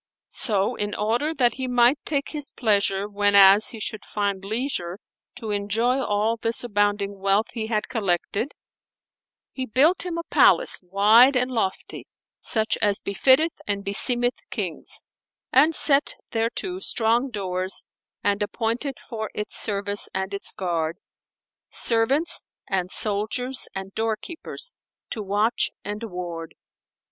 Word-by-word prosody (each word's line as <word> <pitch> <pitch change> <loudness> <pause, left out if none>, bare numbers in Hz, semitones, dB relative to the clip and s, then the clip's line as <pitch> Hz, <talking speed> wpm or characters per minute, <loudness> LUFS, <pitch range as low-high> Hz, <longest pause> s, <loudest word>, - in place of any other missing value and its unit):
So, 205 -5 +1
in 205 0 -4
order 235 +9 0
that 245 -4 +2
he 260 -1 -4
might 245 +3 +3
take 280 -2 0
his 295 -2 0
pleasure 200 -3 +1
whenas 205 0 +6
he 225 - -7
should 215 0 -4
find 200 -2 -2
leisure 200 -5 -3 0.4
to 220 -2 -6
enjoy 225 +6 0
all 215 +2 0
this 230 +1 -2
abounding 205 -3 0
wealth 195 +3 +1
he 220 -2 -4
had 215 -1 -1
collected, 215 +2 -2 1.0
he 260 -1 -5
built 290 - +3
him 350 -2 -4
a 335 - -3
palace - - +3
wide 210 +8 +5
and 250 +1 +1
lofty 205 -6 -3 0.3
such 220 -1 0
as 205 -1 +2
befitteth 260 +10 +3 0.2
and 200 -1 -2
beseemeth 245 +5 +3
Kings; - - -3 0.5
and 300 +5 +5
set 280 -1 +5 0.2
thereto 240 - -2
strong 235 -4 +1
doors 185 -4 -2 0.4
and 205 0 +1
appointed, 235 +6 -2
for 220 -2 -5
its 210 - -4
service 205 -1 -1
and 190 +1 -2
its 200 - -2
guard, 170 -3 -2 0.7
servants 255 +8 +1 0.3
and 185 -2 -1
soldiers 220 +6 0
and 195 0 -6
doorkeepers 225 - -3 0.4
to 220 - -3
watch 205 +3 +1
and 205 +2 -5
ward. 175 -4 -7
215 Hz, 130 wpm, -24 LUFS, 200-250 Hz, 1.0 s, whenas